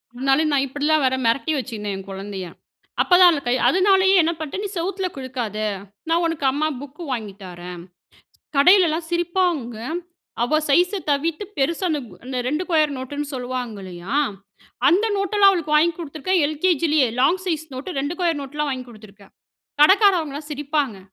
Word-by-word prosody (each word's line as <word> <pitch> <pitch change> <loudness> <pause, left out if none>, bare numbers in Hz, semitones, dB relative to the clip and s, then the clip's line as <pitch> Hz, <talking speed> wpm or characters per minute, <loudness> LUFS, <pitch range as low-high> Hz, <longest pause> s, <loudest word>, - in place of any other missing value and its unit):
முன்னால 270 +4 +2
நா 285 - +3
இப்படிலாம் 290 +2 +1
வேற 260 - +2
மெரட்டி 275 +7 +1
வச்சிருந்தேன், 215 -6 -4
என் 195 0 -10
கொழந்தைய. 195 -1 -6 0.6
அப்பதான் 360 0 +6
அதுல 290 - -1
கை 245 - +2
அதுனாலேயே 380 +1 +4
என்ன 330 - +1
பண்ணிட்டேன், 315 +6 -4
"நீ - - -3
செவுத்துல 375 +2 -2
கிறுக்காத, 250 -5 -4 0.5
நா - - +3
உனக்கு 325 -4 -2
அம்மா 300 +3 0
புக்கு 290 +4 -10
வாங்கி 220 -5 -4
தாரேன்." 175 -1 -8 0.8
கடையிலல்லாம் 335 +1 +4
சிரிப்பாங்க. 345 - 0 0.7
அவ 310 +6 +2
சைஷு 360 +7 +3
தவிர்த்து 310 +6 0
பெருசா 330 +7 0
அந்த 300 -2 0 0.2
அந்த 255 0 -4
2 305 +6 -1
கொயர் 305 -3 +2
நோட்டுன்னு 285 +3 -5
சொல்லுவாங்க 250 -3 -4
இல்லையா? 180 +4 -7 0.7
அந்த 385 +6 +3
நோட்டெல்லாம் 395 0 +4
அவளுக்கு 315 -5 -1
வாங்கி 335 +3 +4
குடுத்துருக்கேன், 325 +2 -1
எல்கேஜிலேயே. 310 -3 +2
லாங் 325 +8 +3
சைஸ் 320 -3 -2
நோட்டு, 275 +4 -5
2 290 +5 -3
கோயர் 335 -4 +1
நோட்லாம் 295 +2 -3
வாங்கி 255 -2 -4
குடுத்துருக்கேன். 205 -3 -16 0.5
கடக்காரவங்கலாம் 320 -5 +4
சிரிப்பாங்க. 290 -5 -2
295 Hz, 150 wpm, -22 LUFS, 255-345 Hz, 0.8 s, அப்பதான்